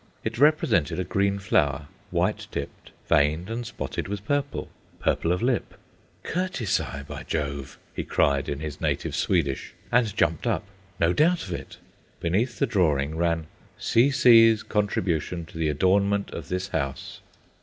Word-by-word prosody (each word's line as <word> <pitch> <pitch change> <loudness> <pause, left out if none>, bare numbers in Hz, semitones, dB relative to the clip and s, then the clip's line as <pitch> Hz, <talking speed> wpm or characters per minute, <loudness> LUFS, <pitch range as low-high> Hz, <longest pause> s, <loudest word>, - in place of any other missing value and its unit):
It 110 +1 -3
represented 140 - +3
a - - +1
green 100 +3 +1
flower, 75 -8 +1 0.2
white - - 0
tipped, - - -6 0.2
veined 75 +7 +2
and 120 +1 -3
spotted - - -4
with 100 +1 -5
purple, 145 +1 -1 0.3
purple 85 - +1
of 90 +3 0
lip. 125 -1 0 0.5
"Curtisi, 105 - -2
by - - -6
Jove!" 70 -3 -4 0.2
he - - -3
cried, 70 -1 +1
in 70 0 -3
his 75 -2 -6
native - - -1
Swedish, 70 -1 0 0.2
and 115 -5 +2
jumped 80 +8 +1
up. 115 - 0 0.4
No 85 +1 +3
doubt 170 - +3
of 90 - -5
it! - - -7 0.4
Beneath 100 +9 0
the - - +2
drawing 80 - +1
ran: 85 -1 0 0.3
"C.C.'s 115 -3 +5
contribution 90 -5 -1
to 80 - -11
the 80 -2 +1
adornment 100 +6 +2
of 80 -4 -7
this 90 +1 -2
house." 70 -5 -4
90 Hz, 145 wpm, -26 LUFS, 75-115 Hz, 0.5 s, C.C.'s